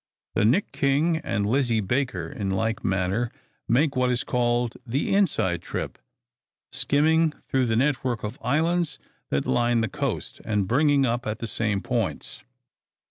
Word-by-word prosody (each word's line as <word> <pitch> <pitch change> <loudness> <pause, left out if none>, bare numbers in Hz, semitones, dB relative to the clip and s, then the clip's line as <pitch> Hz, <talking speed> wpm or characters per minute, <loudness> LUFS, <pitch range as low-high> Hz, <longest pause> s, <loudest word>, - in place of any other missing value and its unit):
The - - +2
"Nick 150 - +2
King" 150 +5 +2
and 125 -10 -2
"Lizzie 120 0 +2
Baker," 110 -4 -1
in 100 +3 -4
like 110 +4 -1
manner, 95 +5 0 0.4
make 140 +5 +2
what 125 0 +2
is 125 -1 +1
called 120 -1 0
the 130 +8 -1
inside 120 - +2
trip, - - -5 0.7
skimming 160 +2 +2
through 130 -2 +1
the 115 - +1
network 125 -2 0
of 105 +4 -5
islands 155 +4 +1 0.3
that 70 - 0
line 120 -1 +2
the 110 - 0
coast, - - -4
and 105 -3 0
bringing 140 +3 +3
up 120 -1 -1
at 110 0 -2
the 115 - -5
same 110 -3 -1
points. 120 -5 -2
120 Hz, 150 wpm, -25 LUFS, 110-140 Hz, 0.7 s, bringing